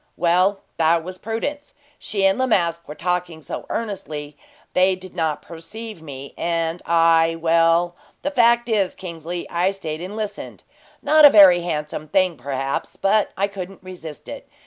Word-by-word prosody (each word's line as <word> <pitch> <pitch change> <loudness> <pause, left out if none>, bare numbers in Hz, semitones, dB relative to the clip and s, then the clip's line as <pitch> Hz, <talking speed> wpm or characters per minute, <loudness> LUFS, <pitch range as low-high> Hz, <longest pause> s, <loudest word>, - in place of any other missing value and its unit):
"Well, 180 +4 +2 0.2
that 165 0 +3
was 185 +2 -8
Prudence. 285 +7 -4 0.2
She 200 -2 0
and 195 +5 +3
La 260 - +2
Masque 170 -6 0
were 150 - -8
talking 175 -1 -2
so - - -6
earnestly 155 -9 -5 0.4
they 185 +1 +3
did 185 0 -12
not 160 -4 -1
perceive 175 +4 -9
me, 140 -3 -9
and 165 0 -1
I 165 0 +4
well, 165 +1 +3 0.3
the 290 - -1
fact 235 -2 +4
is, 205 -5 +1
Kingsley, 170 -1 -6
I 175 +2 +1
stayed 165 -5 -5
and 185 +4 -6
listened. 215 -2 -6 0.4
Not 310 0 +5
a 290 - +12
very 195 -7 +8
handsome 155 -2 -4
thing, 185 +2 +2
perhaps, 135 +1 -4
but 205 +1 +2
I 200 +1 +1
couldn't 195 -1 -8
resist 175 -5 -9
it. - - -9
175 Hz, 160 wpm, -22 LUFS, 165-195 Hz, 0.4 s, a